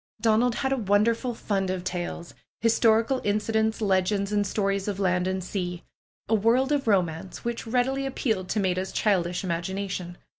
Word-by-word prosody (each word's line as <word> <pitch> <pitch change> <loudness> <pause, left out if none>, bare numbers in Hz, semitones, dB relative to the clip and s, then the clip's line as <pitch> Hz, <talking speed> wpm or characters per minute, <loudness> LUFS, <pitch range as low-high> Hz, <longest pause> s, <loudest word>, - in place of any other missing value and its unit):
Donald 230 +1 +3
had 265 0 0
a - - 0
wonderful 225 +3 +1
fund 195 -4 -1
of 185 -1 -2
tales; 175 -1 -4 0.3
historical 230 +2 +3
in 205 -2 +1
cidents, 220 +1 0
legends 195 0 +1
and 205 -1 +1
stories 195 -1 -1
of 200 -2 -2
land 180 -1 +1
and 190 0 -2
sea; 180 -2 -4 0.4
a 225 - 0
world 235 +6 +3
of 285 -4 0
romance, 180 -3 0
which 235 -1 -3
readily 265 +3 0
appealed 220 -8 -2
to 215 - 0
Maida's 185 -1 0
childish 180 -4 +1
imagination. 185 0 -3
205 Hz, 160 wpm, -26 LUFS, 185-230 Hz, 0.4 s, Donald